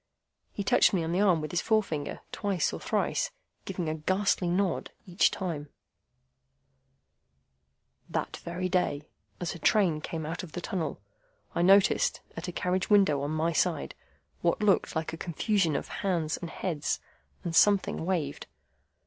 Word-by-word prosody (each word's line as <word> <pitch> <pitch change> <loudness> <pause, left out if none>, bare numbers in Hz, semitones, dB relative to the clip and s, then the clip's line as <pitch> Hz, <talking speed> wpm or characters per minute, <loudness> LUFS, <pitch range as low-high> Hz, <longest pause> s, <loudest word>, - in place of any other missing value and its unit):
He 200 - -4
touched 195 - +4
me 175 - +1
on 160 - -2
the 180 +3 +2
arm 180 -6 +4
with 155 -1 -5
his 175 - +1
forefinger 195 -10 0
twice 195 -6 0
or - - -4
thrice - - 0 0.4
giving 180 -3 -3
a 155 - 0
ghastly 185 +3 +1
nod 185 0 0 0.2
each 180 0 +3
time:— 155 -6 -4 2.4
"That - - -2
very 180 +2 -3
day, 180 -5 0 0.4
as 175 -2 -2
a 175 - -9
train 180 -9 +3
came 160 0 -4
out 165 +3 -4
of 175 -4 -10
the - - -3
tunnel, 175 -4 -3 0.5
I - - 0
noticed, 195 +2 +4
at 165 +2 -5
a - - -3
carriage 180 +2 -1
window 195 -9 +4
on 145 - -2
my 160 +2 0
side, - - 0 0.5
what 170 - +2
looked 200 -4 +2
like 160 0 -2
a - - -5
confusion 170 0 0
of - - -3
hands 170 -5 0
and 170 - -6
heads, 160 -5 -2 0.4
and 165 -1 -3
something 200 0 +4
waved. 165 -6 -2
175 Hz, 155 wpm, -29 LUFS, 160-190 Hz, 2.4 s, touched